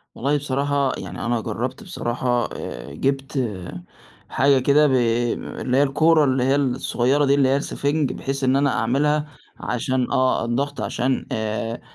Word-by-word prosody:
والله 140 +4 0
بصراحة 140 0 0
يعني، - - -6
أنا 120 -1 0
جربت 120 - -4
بصراحة، 120 - -1
آآ 65 +4 -7
جِبت 135 - -1 0.9
حاجة 135 +1 +3
كده، 145 +3 +4
ب - - 0 0.7
اللي 125 0 0
هي 140 - +5
الكورة 155 +3 +3
اللي 130 -2 +1
هي 135 +2 +3
الصغيرة 135 +1 +1
دي، 140 0 +4
اللي 135 -2 +3
هي 135 - +3
السفنج، 140 0 -1
بحيث 135 0 -4
إن 130 +1 +3
أنا 140 -1 +2
أعملها 150 +5 +1 0.3
عشان 125 +1 -1
آه، 130 -2 +2
الضغط، 140 +5 -2
عشان 130 +1 -1
آآ 110 +1 -3
135 Hz, 150 wpm, -22 LUFS, 125-145 Hz, 0.9 s, هي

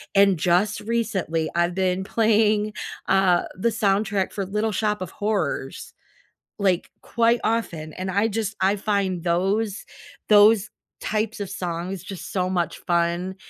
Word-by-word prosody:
and 195 -2 +5
just 180 +5 +2
recently, 200 -8 -1
I've 175 +1 +1
been 185 0 0
playing, 215 0 +2 0.3
uh, 190 -2 +3
the 210 +6 +1
soundtrack 200 -2 0
for 195 - -3
Little 210 +3 -1
Shop 210 0 -1
of 185 - -5
Horrors, 195 -10 -3 0.6
like, 190 -3 +1
quite 235 0 +2
often, 170 -9 -2
and 185 +1 -5
I 200 +4 +2
just 220 -1 -3
I 195 +2 +3
find 195 -4 -1
those 195 +5 0 0.4
those 210 0 +6 0.3
types 220 +1 -2
of 200 -2 -4
songs 175 +1 -4
just 195 -3 -8
so 185 -2 0
much 175 -3 -1
fun, 175 +1 0
195 Hz, 140 wpm, -23 LUFS, 180-215 Hz, 0.6 s, those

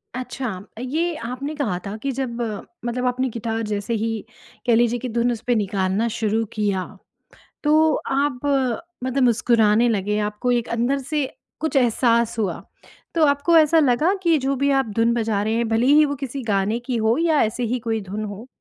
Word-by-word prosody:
अच्छा! 255 0 -4 0.3
ये 315 +7 -1
आपने 265 +5 -4
कहा 220 -11 -1
था 200 - -4
कि 275 +4 -3
जब 255 -2 -3 0.5
मतलब 250 +1 -2
आपने 255 +1 0
गिटार 225 0 -3
जैसे 210 +2 -2
ही 225 - 0 0.6
कह 235 - +5
लीजिए 240 +1 +2
कि 255 - -4
धुन 240 +2 +1
उस 225 - -4
पे 245 - +3
निकालना 200 +1 0
शुरू 220 0 0
किया, 200 -4 0 0.8
तो 310 +1 +4
आप 275 -1 0 0.6
मतलब 260 +1 0
मुस्कुराने 230 -1 +3
लगे 210 -1 0
आपको 210 +4 -2
एक 240 -1 0
अंदर 240 +4 0
से 285 +1 -2 0.3
कुछ 315 -2 -1
एहसास 235 -2 +2
हुआ 200 -5 -1 0.5
तो 325 -2 +4
आपको 285 +4 +3
ऐसा 320 +1 +5
लगा 295 +7 +3
कि 335 -2 +4
जो 275 0 0
भी 280 +2 +1
आप 270 -3 +2
धुन 230 +1 +3
बजा 220 -3 0
रहे 220 +1 0
हैं 230 -1 0
भले 225 +2 +2
ही 300 +2 +6
वो 285 - -2
किसी 270 0 -5
गाने 210 +1 0
की 255 - -1
हो 225 +2 +2
या 325 -3 +3
ऐसे 220 +3 -1
ही 250 - +1
कोई 225 -1 -1
धुन 215 +1 -3
हो 205 +3 -7
240 Hz, 185 wpm, -22 LUFS, 220-275 Hz, 0.8 s, ही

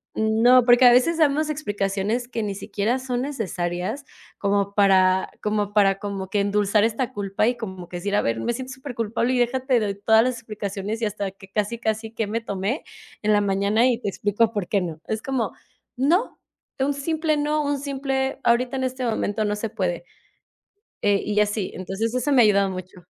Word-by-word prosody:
no, 230 +3 +4
porque 245 +1 +6
a 245 - +9
veces 290 +7 +3
damos 305 0 +2
explicaciones 205 -3 -2
que 235 -2 -3
ni 205 -2 -3
siquiera 210 +4 -1
son 255 -2 -3
necesarias, 190 - -3 0.4
como 200 0 0
para 190 -2 +4
como 210 -1 -1
para 195 -2 +3
como 195 -2 -5
que 210 - +1
endulzar 205 +1 +2
esta 230 +3 -1
culpa 200 0 0
y 245 0 0
como 190 -6 -7
que 175 - -5
decir: 200 +3 -2
"A - - +2
ver, 115 0 0
me 175 - -1
siento 260 +2 -6
superculpable" 245 -2 -2
y - - +1
déja 245 +2 +1
te 255 -1 +2
doy 205 -2 -1
todas 220 +1 +5
las 255 +1 0
explicaciones 210 -2 -5
y - - +3
hasta 205 -1 -3
que 195 0 -15
casi 210 +3 -1
casi 220 -1 -2
que 225 -1 -2
me 220 +3 -2
tomé 200 +5 -2 0.4
en 215 0 +2
la 205 - +4
mañana, 200 +3 +2
y 240 -2 +1
te 205 - -1
explico 205 +3 +1
por 205 -5 -3
qué 200 - +1
no 165 -3 -5
es 220 0 -2
como 250 -6 -1 0.4
no, 330 - +1 0.4
un 275 +2 +1
simple 310 +2 -1
no, 300 +1 0
un 285 -1 -1
simple 270 -1 -2
ahorita 245 +2 +2
en 260 - -2
este 255 0 -3
momento 220 -2 -1
no 205 0 0
se 215 +2 -4
puede 185 -6 -2 1.0
eh, 200 -1 +2
y 210 0 +1
así, 210 -2 0
entonces 195 +5 -3
eso 255 +3 0
me 255 -3 +6
ha - - +6
ayudado 200 -2 +3
mucho. 185 -1 -9
220 Hz, 200 wpm, -23 LUFS, 200-255 Hz, 1.0 s, a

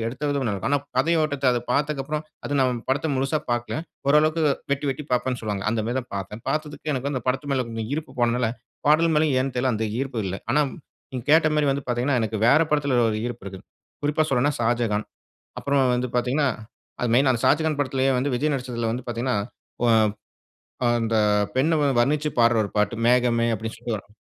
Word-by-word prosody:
எடுத்த 125 +5 -6
விதம் 140 -1 0
நல்லா 105 - 0
இருக்கும். 95 - -3
ஆனா 145 - +4 0.2
கதையோட்டத்த 155 -1 +1
அத 120 - +1
பார்த்ததுக்கப்பறம் 150 +2 -1 0.2
அது 145 - -1
நான் 125 -3 +1
படத்தை 140 +4 0
முழுசா 135 +4 0
பார்க்கல. 120 0 -1 0.3
ஓரளவுக்கு 155 +3 +4 0.3
வெட்டி 140 +1 -1
வெட்டி 135 +3 -4
பார்ப்பேன்ன்னு 125 0 0
சொல்லுவாங்க. 105 -3 -3
அந்த 110 0 0
மாரி 120 +2 -2
தான் 125 - -14
பார்த்தேன். 100 +3 -6
பார்த்ததுக்கு 155 0 -3
எனக்கு 135 0 -3
வந்து 145 - -3
அந்த - - -22
படத்து 135 +3 -1
மேல 130 -2 +1
இருந்த 115 -1 -4
ஈர்ப்பு 150 -3 -5
போனதால 120 -1 +2 0.4
பாடல் 165 +2 +5
மேலயும் 150 -2 +3
ஏன்னு 135 0 -2
தெரியல 125 +1 +1
அந்த 110 +1 -1
ஈர்ப்பு 135 -4 -3
இல்ல. 95 0 -3
ஆனா 140 +5 +3 0.5
நீங்க 125 -3 -5
கேட்ட 160 0 +6
மாரி 150 -1 +2
வந்து 140 0 -4
பார்த்தீங்கன்னா 125 +2 +1
எனக்கு 110 0 -2
வேற 140 +6 +6
படத்தில 140 -4 +2
ஒரு 110 - -2
ஈர்ப்பு 120 -5 -6
இருக்கு. 95 -1 -8 0.4
குறிப்பா 150 +2 +1
சொல்லணுன்னா 145 +4 +2
ஷாஜகான். 115 -2 0 0.5
அப்பறம் 135 -3 +2
வந்து 125 0 -2
பார்த்தீங்கன்னா 130 +4 +1 0.5
அது 125 - 0
மெயினா 130 +2 +4
அந்த 115 - -3
ஷாஜகான் 155 +2 +2
படத்திலேயே 135 -1 +1
வந்து 135 +2 -1
விஜய் 150 +3 0
நடிச்சதில 120 -3 -2
வந்து 125 +1 -4
பார்த்தீங்கன்னா 120 0 -1 0.5
ஒ - - +4 0.8
ப் 125 - -7
அந்த 115 0 0 0.4
பெண்ண 155 +5 +3
வந்து 135 -4 +2
வர்ணிச்சுப் 150 +2 0
பாடுற 115 0 +5
ஒரு - - -7
பாட்டு 105 +2 +1
மேகமே 120 -1 +3
அப்படின்னு 110 +2 -6
சொல்லி 120 -1 -3
வரும். 100 +1 -15
130 Hz, 195 wpm, -24 LUFS, 120-145 Hz, 0.8 s, கேட்ட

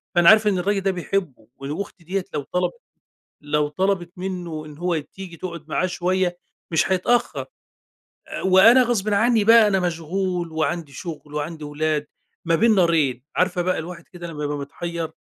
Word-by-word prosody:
فأنا 175 -1 +7
عارف 220 -1 +6
إن 200 -3 +2
الراجل 195 +2 0
ده 195 0 +1
بيحبُه، 175 - -3
و 135 - -7
وأختي 190 -3 -7
ديَّة 185 +2 -2
لو - - -1
طَلَبِت 180 - -1 0.6
لو 150 0 0
طَلَبِت 180 +2 -1
منّه 175 -4 -4
إن 150 -1 -12
هو 175 -1 0
تيجي 175 +3 -9
تقعد 170 -3 -7
معاه 185 - 0
شويّة 180 0 0 0.3
مش 165 +3 +2
هيتأخر، 240 +6 +1 0.8
آآ، - - -5
وأنا 195 +7 +7
غصبٍ 225 -4 0
عنّي 225 +1 +3
بقى 225 0 +7
أنا 195 -2 +2
مشغول 175 0 -2
وعندي 160 -1 -2
شغل، 150 0 -8
وعندي 155 +1 -4
ولاد، 150 0 -1 0.4
ما 165 0 +3
بين 225 +5 +4
نارين. 160 -9 +2
عارفة 180 -1 +1
بقى 185 +1 0
الواحد 170 +1 -8
كده 175 -1 -7
لمّا 150 -3 -6
يبقى 145 0 -2
متحيّر 165 +3 -5
175 Hz, 170 wpm, -23 LUFS, 155-190 Hz, 0.8 s, فأنا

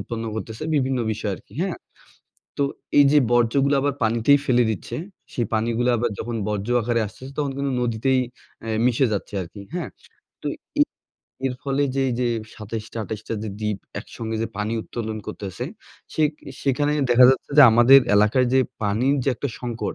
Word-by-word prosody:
উৎপন্ন 115 -1 -5
করতেছে 110 0 -6
বিভিন্ন 130 -3 +1
বিষয় 105 -1 -3
আরকি। - - -19
হ্যাঁ? 190 -3 -2 0.8
তো - - +4 0.3
এইযে 145 +1 +6
বর্জ্যগুলা 130 +4 +3
আবার 145 0 0
পানিতেই 115 +5 +4
ফেলে 125 -1 +4
দিচ্ছে, 110 - -4 0.4
সেই 120 -3 -1
পানিগুলা 115 +2 +1
আবার 120 0 0
যখন 120 +1 -3
বর্জ্য 105 +2 -2
আকারে 115 +1 0
আসতেছে 130 +6 -10
তখন 145 -2 0
কিন্তু 140 -1 -1
নদীতেই 125 +3 +1 0.4
অ্যা 115 - -5 0.2
মিশে 125 +1 +3
যাচ্ছে 105 0 -3
আরকি। 90 +4 -10
হ্যাঁ? 170 -8 -3 0.5
তো - - -3 0.3
এ - - +9 0.6
এর 130 - -1
ফলে 140 0 0
যে 135 - +1
এইযে 120 0 0 0.3
২৭ 110 +1 -6
টা - - -5
২৮ 110 0 -5
টা - - -1
যে 110 - -4
দ্বীপ 105 -2 -1 0.2
একসঙ্গে 115 -1 -5
যে - - 0
পানি 105 +2 -1
উত্তোলন 110 -2 -5
করতেছে, 100 +4 -5 0.5
সেক 155 -2 +3 0.3
সেখানে 145 +2 +1 0.2
দেখা 125 +1 +7
যাচ্ছে 135 - -1
যে, - - +12
আমাদের 120 +4 +8
এলাকায় 105 +5 +4
যে 130 - +5 0.2
পানির 110 +7 +2
যে - - +1
একটা 140 +4 -3
সংকট 115 -5 -3
120 Hz, 170 wpm, -23 LUFS, 110-135 Hz, 0.8 s, যে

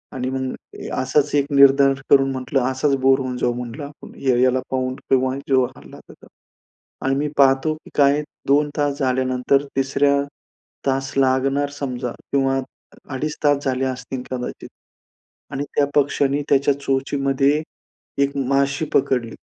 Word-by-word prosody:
आणि 130 0 -2
मग 130 0 -6
असाच 145 +2 +1
एक 140 -1 +3
निर्धार 140 0 +6 0.2
करून 135 -1 +5
म्हटलं, 130 +1 -1
असाच 135 +2 +1
बोर 135 +1 +4
होऊन 130 -1 -3
जाऊ, 120 0 0
म्हटलं 125 +4 -6
आपण 145 +1 -12
या 130 -3 +2
याला 130 0 +3
पाहून, 130 -1 -1
तेव्हा 130 0 +2
जो 130 -2 +4
हलला - - -13
तर - - -12
तो. - - -19 0.8
आणि 135 0 +2
मी 145 +2 0
पाहतो 135 +2 +4
की 155 - -16
काय, 145 0 +4 0.3
2 145 +2 +3
तास 145 -1 0
झाल्यानंतर, 130 +1 +1
3ऱ्या 140 +1 +2 0.7
तास 135 0 0
लागणार 135 +2 +2
समजा 130 -4 -4 0.2
किंवा 135 -1 +2 0.5
अडीच 150 +3 -3
तास 145 -1 +3
झाले 130 0 0
असतील 130 0 -4
कदाचित. 125 -1 -5 0.8
आणि 140 0 -3
त्या 145 - +4
पक्षाने 140 0 +2
त्याच्या 140 +1 +3
चोचीमध्ये 135 +1 +1 0.6
एक 140 0 -2
माशी 140 +2 +1
पकडली. 125 -4 +1
135 Hz, 145 wpm, -21 LUFS, 130-140 Hz, 0.8 s, निर्धार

